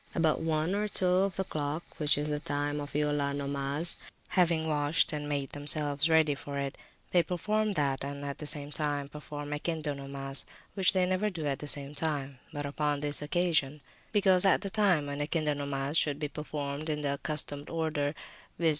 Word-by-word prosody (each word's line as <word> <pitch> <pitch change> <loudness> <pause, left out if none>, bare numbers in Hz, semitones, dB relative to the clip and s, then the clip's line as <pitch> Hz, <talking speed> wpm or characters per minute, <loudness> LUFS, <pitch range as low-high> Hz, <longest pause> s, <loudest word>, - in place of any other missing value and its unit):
About 160 -2 +2
one 160 +2 0
or 210 +1 0
two 195 - +3
of 185 +1 +2
the 190 - -1
clock, 155 -1 -3 0.2
which 150 -2 +3
is 150 +1 -1
the 150 0 -1
time 145 0 -2
of 145 - -7
Eulea 145 -1 +1
nomas, 140 +3 -2 0.3
having 170 -3 +2
washed 150 +2 +2
and 150 -1 -3
made 140 -2 -1
themselves 145 +1 +4
ready 160 -2 +5
for 140 +1 -6
it, 140 -1 -2 0.4
they 175 - +5
perform 210 +5 0
that, 140 -6 0
and 140 0 -5
at 140 -1 -5
the 150 - -5
same 145 -1 +1
time 145 -2 -2
perform 145 0 -7
Ekinde 150 -1 -2
nomas, 135 0 -3 0.3
which 190 -2 +4
they 185 -1 +3
never 185 +3 +1
do 165 -6 -5
at 140 -2 -1 0.2
one 140 0 -7
time, 140 -3 -2
but 145 0 -4
upon 145 0 -1
this 145 0 +1
occasion; 150 -2 +1 0.3
because 190 -3 +5
at 195 - +4
the 200 -2 -4
time 190 -8 +3
when 145 0 -4
Ekinde 150 0 0
nomas 140 0 -2
should 145 -3 +1
be 150 0 -2
performed 145 0 -4
in 150 -1 -1
the 140 -1 0
accustomed 145 0 -3
order, 155 -2 -1 0.4
viz. 165 -1 +3
150 Hz, 190 wpm, -30 LUFS, 145-165 Hz, 0.4 s, ready